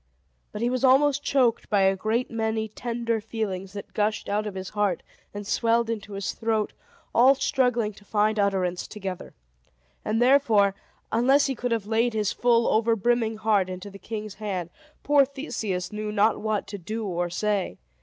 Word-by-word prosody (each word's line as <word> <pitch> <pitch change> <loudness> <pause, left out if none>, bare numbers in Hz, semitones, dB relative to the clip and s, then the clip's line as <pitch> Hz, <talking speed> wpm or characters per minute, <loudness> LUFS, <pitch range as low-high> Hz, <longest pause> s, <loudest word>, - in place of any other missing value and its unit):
But 210 +2 -4
he 240 - +2
was 255 0 -2
almost 275 +2 +4
choked 255 -5 +1
by 205 -2 +3
a 195 0 +4
great 220 +6 -1
many 220 -1 -1
tender 230 0 -2
feelings 200 -4 -4
that 200 -1 -8
gushed 215 +2 0
out 210 +1 -1
of 200 - -6
his 190 0 -5
heart 205 -4 0 0.3
and 205 0 -7
swelled 230 +2 +1
into 210 -2 -5
his 195 0 -3
throat, 220 -2 -1 0.4
all 260 +4 +6
struggling 250 -5 +1
to 205 - -17
find 210 +1 +1
utterance 190 -3 0
together. 195 -4 -7 0.7
And 215 +1 0
therefore, 235 -6 +4 0.4
unless 265 +5 +4
he 275 - 0
could 245 0 -3
have 225 -3 0
laid 225 +2 +1
his 210 -2 0
full, 235 -1 +3
over 225 +1 +3
brimming 225 +1 +1
heart 210 -4 +2
into 185 +2 -7
the 200 - -12
king's 215 -1 -6
hand, 185 -5 -3 0.3
poor 290 -1 +5
Theseus 230 - -4
knew 210 0 -3
not 210 +1 +2
what 215 -1 -1
to 200 0 -6
do 215 +5 -4
or 175 -2 -2
say. 200 - -1
215 Hz, 175 wpm, -26 LUFS, 200-235 Hz, 0.7 s, all